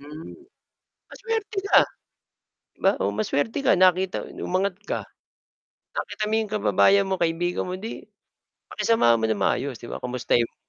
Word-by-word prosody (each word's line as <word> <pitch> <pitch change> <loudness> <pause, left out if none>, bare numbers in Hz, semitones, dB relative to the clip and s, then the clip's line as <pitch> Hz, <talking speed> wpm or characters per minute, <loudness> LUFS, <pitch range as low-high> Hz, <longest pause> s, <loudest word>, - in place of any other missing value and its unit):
Hmm, 150 +3 -10 0.8
masuwerte 445 -3 -4
ka, 400 - +6 1.0
'di - - -35
ba, 195 - +5
o 100 +1 -1
masuwerte 145 - -1
ka, 270 - +3
nakita 185 0 +3 0.2
no'ng - - -6
umangat 185 +1 0
ka, - - 0 1.0
nakita - - -4
mo 220 - 0
yung 220 -2 -2
kababayan 200 -1 +3
mo, 190 - 0
kaibigan 175 0 -1
mo, 180 - -4
'di, 225 +3 -7 0.6
pakisamahan 120 - +3
mo 110 - -4
nang 110 -2 -1
maayos, 125 +5 0
'di 120 - -10
ba? - - -7
Kumustahin 125 -1 +1
mo. 115 - -8
180 Hz, 155 wpm, -24 LUFS, 125-210 Hz, 1.0 s, ka